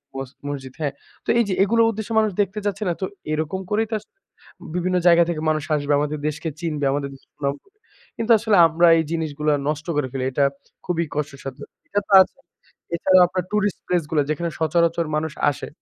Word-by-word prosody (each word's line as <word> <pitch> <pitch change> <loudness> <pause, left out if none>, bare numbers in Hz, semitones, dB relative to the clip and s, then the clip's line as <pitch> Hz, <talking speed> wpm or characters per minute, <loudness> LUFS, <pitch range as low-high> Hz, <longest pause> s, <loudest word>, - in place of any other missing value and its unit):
মস 135 -1 -5 0.2
মসজিদ, 135 -2 -5
হ্যাঁ? 140 -2 -1 0.3
তো - - -7
এই - - +5
যে, - - +1
এগুলো 230 +3 +3
উদ্দেশ্যে 220 +1 -5
মানুষ 215 -2 +2
দেখতে 200 +2 -2
যাচ্ছে 205 +1 -1
না? - - +1
তো - - +1 0.3
এরকম 155 +4 -2
করেই 220 +1 +1
তো - - -5
আসলে 390 - -26 0.6
বিভিন্ন 180 +1 +1
জায়গা 170 0 +7
থেকে 155 -2 -2
মানুষ 155 -1 0
আসবে, 145 0 -2
আমাদের 150 0 -2
দেশকে 155 +2 -3
চিনবে, 150 -4 -2
আমাদের 140 0 -2
দেশের 135 - -18
সুনাম 140 -1 -1
হবে। 400 +1 -32 0.4
কিন্তু 230 +1 0
আসলে 215 -1 +2
আমরা 170 +2 +3
এই 160 - +2
জিনিসগুলা 150 -2 -1 0.2
নষ্ট 155 +1 -3
করে 140 -3 +1
ফেলি। 130 -1 -3
এটা 140 +2 +2 0.4
খুবই 170 -2 0
কষ্টসাধ্য। 140 -3 -5 0.3
এটা 205 0 0
তো - - 0
আছে। - - -17 0.6
এছাড়াও 185 +1 +5
আপনার 180 0 -2
টুরিস্ট 205 -1 0
প্লেস 175 -2 +1
গুলা, 150 -3 +3
যেখানে 170 +3 -2
সচরাচর 170 +1 +2
মানুষ 155 -1 -2 0.2
আসে। - - -7
165 Hz, 195 wpm, -22 LUFS, 145-190 Hz, 0.6 s, জায়গা